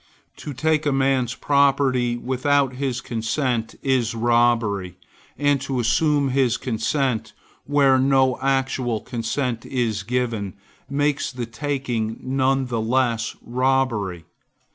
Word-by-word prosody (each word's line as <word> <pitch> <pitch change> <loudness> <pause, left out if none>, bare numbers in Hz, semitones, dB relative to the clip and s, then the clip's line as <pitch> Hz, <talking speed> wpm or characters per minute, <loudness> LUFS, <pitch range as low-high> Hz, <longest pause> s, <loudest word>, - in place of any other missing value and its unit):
To 150 - -7
take 155 +3 0
a - - +3
man's 135 -2 +1
property 135 -4 +2
without 130 +2 +1
his 130 -1 -2
consent 115 0 -2
is 125 -4 +1
robbery; 115 -6 +1 0.4
and 145 -2 +2
to 135 -2 -2
assume 140 +4 +2
his 130 -3 +2
consent, 125 +1 -1 0.3
where 140 -2 +4
no 130 -1 +3
actual 130 -3 0
consent 120 0 -3
is 120 -5 -1
given, 115 -5 -2 0.3
makes 145 +1 0
the 125 -2 -4
taking 120 -3 -3
none 135 0 +1
the 120 -3 -2
less 115 -1 0
robbery. 120 -9 0
130 Hz, 115 wpm, -22 LUFS, 115-135 Hz, 0.4 s, where